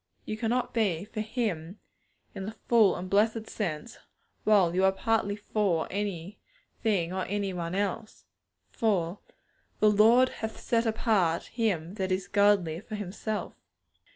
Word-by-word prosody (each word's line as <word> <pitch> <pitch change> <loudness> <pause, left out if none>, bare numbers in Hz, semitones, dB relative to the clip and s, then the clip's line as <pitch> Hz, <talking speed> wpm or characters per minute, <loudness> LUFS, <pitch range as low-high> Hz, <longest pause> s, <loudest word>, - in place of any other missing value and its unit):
You 215 - -3
cannot 235 +3 -1
be 200 -6 0
'for 215 - -5
Him,' 210 -6 -3 0.6
in 195 -1 -6
the 220 - -6
full 220 -5 +5
and 185 - -5
blessed 220 +3 +2
sense, 205 +3 -4 0.5
while 195 -6 +4
you 185 +1 +2
are 190 - +5
partly 205 0 0
'for' 205 -5 0
anything 200 - -3
or 190 0 -1
any 200 -1 -2
one 175 0 -3
else. 205 +2 -3 0.5
For 195 -4 0 0.6
'the 215 0 +5
Lord 230 +5 +6
hath 220 0 -6
set 230 0 +1
apart 205 -7 +1
him 195 -8 -1
that 190 -2 -1
is 185 0 -1
godly 200 -5 +3
for 215 +2 -7
Himself.' 210 +2 -4
205 Hz, 140 wpm, -28 LUFS, 185-220 Hz, 0.6 s, Lord